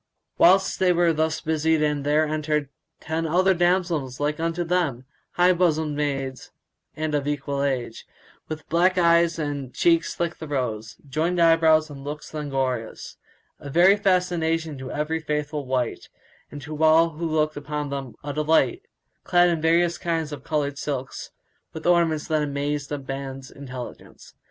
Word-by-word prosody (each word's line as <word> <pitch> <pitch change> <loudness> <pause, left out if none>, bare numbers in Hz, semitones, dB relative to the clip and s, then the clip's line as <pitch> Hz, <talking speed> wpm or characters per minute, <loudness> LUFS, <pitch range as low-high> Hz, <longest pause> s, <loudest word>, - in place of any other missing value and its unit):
Whilst 190 +2 +4
they 185 -1 +4
were 175 -1 +3
thus 160 +1 -1
busied 155 -2 +1
there 150 +2 +2
entered 150 -2 -1 0.4
other 165 +4 +2
ten - - -7
damsels 175 -7 +1
like 150 +1 -1
unto 165 +1 -1
them, 165 -8 -1 0.3
high 180 +1 +4
bosomed 160 -4 +1
maids 135 -3 -3 0.5
and 155 0 -3
of 145 -1 0
an - - +1
equal 140 -1 -3
age, 130 -5 -3 0.4
with 155 -1 -7
black 180 +3 +2
eyes 170 -1 +4
and 145 -4 -4
cheeks 165 -1 +2
like 170 0 -2
the 160 - -7
rose, 115 -6 -3
joined 160 +6 -1
eyebrows 160 -2 +4
and 140 -1 -9
looks 150 +2 -7
languorous; 135 -6 -3 0.4
a 140 - -8
very 175 +7 +5
fascination 175 -5 0
to 130 0 -7
every 150 +2 -2
faithful 150 -2 -3
wight 125 -2 -2 0.4
and 145 -1 -9
to 155 +1 -4
all 160 +1 +5
who 165 +2 -4
looked 155 -1 0
upon 145 0 -4
them 135 -3 -5
a 145 0 -4
delight; 160 - +2 0.4
clad 175 -1 +4
in 165 -2 -1
various 170 +1 +2
kinds 165 -3 -2
of 140 -2 -7
coloured 145 -2 -2
silks, 135 -2 -4 0.4
with 160 - -8
ornaments 170 -3 +2
that 155 -1 +1
amazed 145 0 -2 0.2
man's 135 -1 -6
intelligence. 130 -3 -10
155 Hz, 155 wpm, -24 LUFS, 140-165 Hz, 0.5 s, very